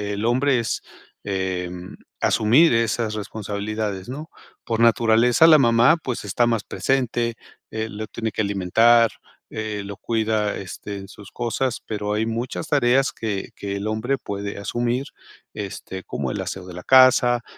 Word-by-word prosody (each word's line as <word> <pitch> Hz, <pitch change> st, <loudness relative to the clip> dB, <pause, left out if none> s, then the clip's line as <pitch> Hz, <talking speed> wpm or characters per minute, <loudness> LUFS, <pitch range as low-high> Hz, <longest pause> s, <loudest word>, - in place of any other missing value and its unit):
el 105 Hz, +2 st, -3 dB
hombre 130 Hz, +3 st, +2 dB
es, 115 Hz, -3 st, -2 dB, 0.4 s
em, 90 Hz, -2 st, -4 dB, 0.3 s
asumir 125 Hz, +10 st, +4 dB
esas 115 Hz, -1 st, 0 dB
responsabilidades, 105 Hz, -1 st, -4 dB
¿no? 150 Hz, +5 st, -7 dB, 0.4 s
Por 115 Hz, -1 st, -2 dB
naturaleza, 115 Hz, +3 st, +4 dB
la 155 Hz, -2 st, +8 dB
mamá, 120 Hz, +4 st, +5 dB
pues 125 Hz, -4 st, -4 dB
está 120 Hz, +4 st, +1 dB
más 115 Hz, -3 st, 0 dB
presente, 120 Hz, -3 st, -1 dB, 0.3 s
eh, 110 Hz, 0 st, -3 dB
lo 110 Hz, 0 st, -6 dB
tiene 110 Hz, 0 st, -4 dB
que -, -, -2 dB
alimentar, 110 Hz, +4 st, +4 dB, 0.4 s
eh, 110 Hz, -2 st, -4 dB
lo 100 Hz, 0 st, -7 dB
cuida, 110 Hz, -1 st, -1 dB
este, 100 Hz, +1 st, -7 dB
en 95 Hz, 0 st, -9 dB
sus 100 Hz, 0 st, -13 dB
cosas, 120 Hz, +1 st, -2 dB
pero 105 Hz, -1 st, -3 dB
hay 110 Hz, +1 st, 0 dB
muchas 115 Hz, +7 st, -4 dB
tareas 135 Hz, -1 st, +3 dB
que 105 Hz, -4 st, -4 dB
que 100 Hz, -1 st, -5 dB
el 100 Hz, +1 st, -4 dB
hombre 110 Hz, +5 st, -1 dB
puede 100 Hz, -3 st, -5 dB
asumir, 120 Hz, +5 st, -2 dB, 0.5 s
este, 95 Hz, -2 st, -7 dB
como -, -, -4 dB
el -, -, -3 dB
aseo 95 Hz, -1 st, -5 dB
de 90 Hz, -, -10 dB
la 90 Hz, +1 st, -8 dB
casa, 125 Hz, -2 st, +5 dB
110 Hz, 155 wpm, -22 LUFS, 100-120 Hz, 0.5 s, la